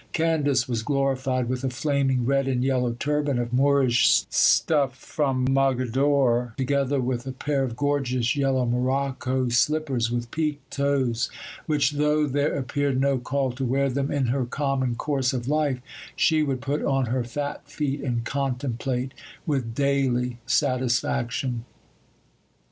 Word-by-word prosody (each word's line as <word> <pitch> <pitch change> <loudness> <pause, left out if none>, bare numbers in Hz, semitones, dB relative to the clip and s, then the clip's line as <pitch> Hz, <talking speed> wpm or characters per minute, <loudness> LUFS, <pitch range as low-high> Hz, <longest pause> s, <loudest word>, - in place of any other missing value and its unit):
Candace 150 -6 +1
was 120 -3 -1
glorified 130 -1 0
with 130 +1 -3
a 135 - 0
flaming 135 -1 0
red 135 +1 +1
and 125 -2 0
yellow 125 -3 +1
turban 145 -1 0
of 120 0 -3
Moorish 135 -2 +4
stuff 140 -5 +3
from 135 -3 -1
Mogadore, 130 -2 +2
together 140 +1 0
with 125 0 -2
a - - -2
pair 140 +2 -1
of 120 -3 -3
gorgeous 130 -3 0
yellow 135 -3 +1
morocco 130 +1 0
slippers 125 0 +1
with 120 0 -3
peaked 150 -2 -3
toes, 140 -3 0 0.4
which, 145 -3 +2
though 150 +1 +2
there 145 +1 0
appeared 140 0 -1
no 135 -1 +2
call 130 +1 -1
to 130 +2 -5
wear 135 +2 +1
them 140 +2 -1
in 140 -2 0
her 125 +1 0
common 135 -2 -1
course 135 0 0
of 125 -1 -3
life, 145 -3 +1 0.4
she 160 -1 +3
would 135 -4 -1
put 140 +5 -2
on 135 -1 +1
her 125 +1 -1
fat 145 +4 -4
feet, 145 -1 -2
and 120 -3 -2
contemplate 130 -1 -2 0.3
with 130 -7 -2
daily 125 -3 0
satisfaction. 120 -1 0
135 Hz, 145 wpm, -25 LUFS, 125-140 Hz, 0.4 s, Moorish